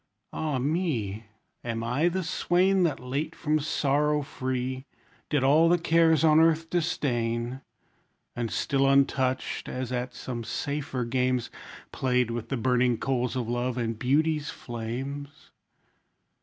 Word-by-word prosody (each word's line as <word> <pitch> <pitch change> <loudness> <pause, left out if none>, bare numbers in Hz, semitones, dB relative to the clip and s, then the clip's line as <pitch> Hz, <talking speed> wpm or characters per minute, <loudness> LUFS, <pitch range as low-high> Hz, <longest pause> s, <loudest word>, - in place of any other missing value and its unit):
Ah 150 -4 -1
me! 125 - -1 0.4
Am 115 -1 -3
I 130 +9 +1
the 185 +2 -2
swain 185 +3 +2
That 165 -5 +1
late 140 +6 -3
from 155 -1 0
sorrow 150 0 +1
free 130 0 -3 0.4
Did 145 -3 +1
all 155 +5 +5
the 175 - +5
cares 165 -1 +3
on 155 -1 +6
earth 165 0 +3
disdain? 120 -7 -1 0.7
And 120 -1 -2
still 135 +3 +1
untouched, 135 -1 +1
as 125 -1 -4
at 125 0 -3
some 120 -2 -5
safer 140 0 -3
games, 125 0 0 0.4
Played 125 -2 +1
with 115 -1 -4
the 135 - -1
burning 125 0 +2
coals 125 -1 -1
of 125 -3 -2
love, 120 +1 -1
and 115 -2 -2
beauty's 150 +4 +1
flames? 130 +5 -6
130 Hz, 130 wpm, -27 LUFS, 125-155 Hz, 0.7 s, on